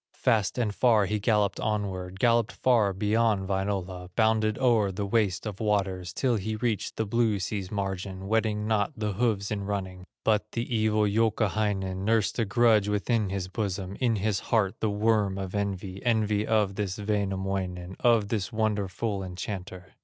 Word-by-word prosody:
Fast 110 Hz, -6 st, +1 dB
and 110 Hz, -4 st, 0 dB
far 110 Hz, -3 st, +4 dB
he 105 Hz, +2 st, -1 dB
galloped 105 Hz, -1 st, +1 dB
onward, 95 Hz, -3 st, -3 dB
Galloped 115 Hz, -1 st, +3 dB
far 115 Hz, -6 st, +3 dB
beyond 105 Hz, 0 st, +1 dB
Wainola, 95 Hz, -2 st, -2 dB
Bounded 110 Hz, -1 st, +2 dB
o'er 115 Hz, -6 st, +3 dB
the 100 Hz, +2 st, -3 dB
waste 100 Hz, -3 st, 0 dB
of 105 Hz, -3 st, -5 dB
waters, 95 Hz, -4 st, 0 dB
Till 125 Hz, +2 st, +1 dB
he 110 Hz, +2 st, -3 dB
reached 110 Hz, -1 st, -2 dB
the 110 Hz, -, -1 dB
blue 110 Hz, 0 st, +1 dB
sea's 95 Hz, 0 st, -3 dB
margin, 95 Hz, -1 st, -4 dB
Wetting 110 Hz, -1 st, 0 dB
not 110 Hz, +4 st, +1 dB
the 105 Hz, -2 st, -2 dB
hoofs 105 Hz, -2 st, 0 dB
in 100 Hz, -1 st, -2 dB
running. 95 Hz, -2 st, -4 dB, 0.2 s
But 105 Hz, -2 st, +1 dB
the 120 Hz, +1 st, -2 dB
evil 110 Hz, -1 st, +2 dB
Youkahainen 105 Hz, -3 st, 0 dB
Nursed 110 Hz, +2 st, +1 dB
a 115 Hz, -, +2 dB
grudge 110 Hz, -1 st, +3 dB
within 105 Hz, 0 st, 0 dB
his 95 Hz, -1 st, -3 dB
bosom, 95 Hz, -1 st, -3 dB
In 120 Hz, -3 st, +2 dB
his 105 Hz, -1 st, 0 dB
heart 105 Hz, -5 st, +1 dB
the 110 Hz, -, 0 dB
worm 105 Hz, -2 st, +1 dB
of 95 Hz, -1 st, -5 dB
envy, 100 Hz, -2 st, -3 dB
Envy 110 Hz, -3 st, +1 dB
of 105 Hz, -3 st, +2 dB
this 100 Hz, -1 st, -3 dB
Wainamoinen, 95 Hz, -3 st, -2 dB
Of 115 Hz, -4 st, +3 dB
this 105 Hz, -2 st, -2 dB
wonderful 105 Hz, -1 st, -1 dB
enchanter. 95 Hz, 0 st, -6 dB
105 Hz, 160 wpm, -27 LUFS, 95-110 Hz, 0.2 s, far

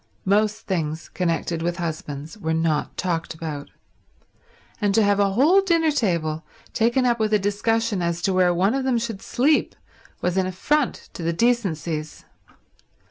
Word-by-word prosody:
Most 210 Hz, +2 st, +1 dB
things 160 Hz, -4 st, -2 dB
connected 170 Hz, -2 st, -1 dB
with 175 Hz, +1 st, -1 dB
husbands 155 Hz, -2 st, -5 dB
were 160 Hz, -6 st, -2 dB
not 160 Hz, -2 st, 0 dB
talked 170 Hz, -3 st, -2 dB
about; 155 Hz, -3 st, -6 dB, 1.1 s
and 205 Hz, -1 st, +2 dB
to 225 Hz, -, +5 dB
have 205 Hz, 0 st, +3 dB
a 200 Hz, -1 st, +2 dB
whole 310 Hz, -, +5 dB
dinner 335 Hz, -4 st, +2 dB
table 170 Hz, -, 0 dB, 0.3 s
taken 240 Hz, +3 st, +2 dB
up 240 Hz, -1 st, +2 dB
with 215 Hz, -1 st, +2 dB
a -, -, +6 dB
discussion 210 Hz, +1 st, 0 dB
as 170 Hz, 0 st, -2 dB
to 195 Hz, -, +2 dB
where 185 Hz, -1 st, +4 dB
one 185 Hz, +5 st, +2 dB
of 270 Hz, 0 st, -1 dB
them 260 Hz, -2 st, +1 dB
should 225 Hz, -4 st, -4 dB
sleep 290 Hz, +5 st, +1 dB, 0.4 s
was 180 Hz, +1 st, -1 dB
an 190 Hz, -1 st, +2 dB
affront 265 Hz, +10 st, -1 dB
to -, -, -7 dB
the 170 Hz, +1 st, 0 dB
decencies. 165 Hz, -8 st, -1 dB
190 Hz, 160 wpm, -23 LUFS, 165-230 Hz, 1.1 s, a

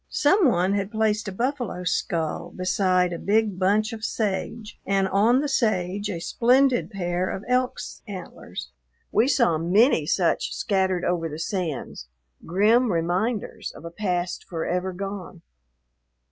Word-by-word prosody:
Some 345 Hz, +4 st, +4 dB
one 185 Hz, -4 st, +2 dB
had 200 Hz, -1 st, -1 dB
placed 215 Hz, -1 st, 0 dB
a -, -, -3 dB
buffalo's 235 Hz, -5 st, -2 dB
skull 160 Hz, -2 st, -2 dB
beside 185 Hz, -1 st, +1 dB
a 170 Hz, -, -5 dB
big 210 Hz, -2 st, +1 dB
bunch 210 Hz, +4 st, +2 dB
of 220 Hz, -1 st, -8 dB
sage 215 Hz, +1 st, -3 dB
and 195 Hz, 0 st, +1 dB
on 225 Hz, +7 st, +3 dB
the 295 Hz, -, -1 dB
sage 205 Hz, -6 st, 0 dB
a 175 Hz, -4 st, -3 dB
splendid 250 Hz, +7 st, +3 dB
pair 180 Hz, -2 st, -2 dB
of 190 Hz, -, -5 dB
elk's 250 Hz, 0 st, -1 dB
antlers. 185 Hz, -4 st, -8 dB, 0.4 s
We 225 Hz, +4 st, +3 dB
saw 170 Hz, -, +3 dB
many 180 Hz, -, +3 dB
such 175 Hz, -1 st, +1 dB
scattered 190 Hz, -3 st, 0 dB
over 170 Hz, -2 st, 0 dB
the 150 Hz, -, -6 dB
sands, 165 Hz, -, -4 dB, 0.4 s
grim 215 Hz, +7 st, +3 dB
reminders 180 Hz, +7 st, -1 dB
of -, -, -12 dB
a 170 Hz, -, -6 dB
past 180 Hz, -2 st, -2 dB
forever 180 Hz, +2 st, -2 dB
gone. 185 Hz, -2 st, -7 dB
195 Hz, 140 wpm, -25 LUFS, 180-220 Hz, 0.4 s, Some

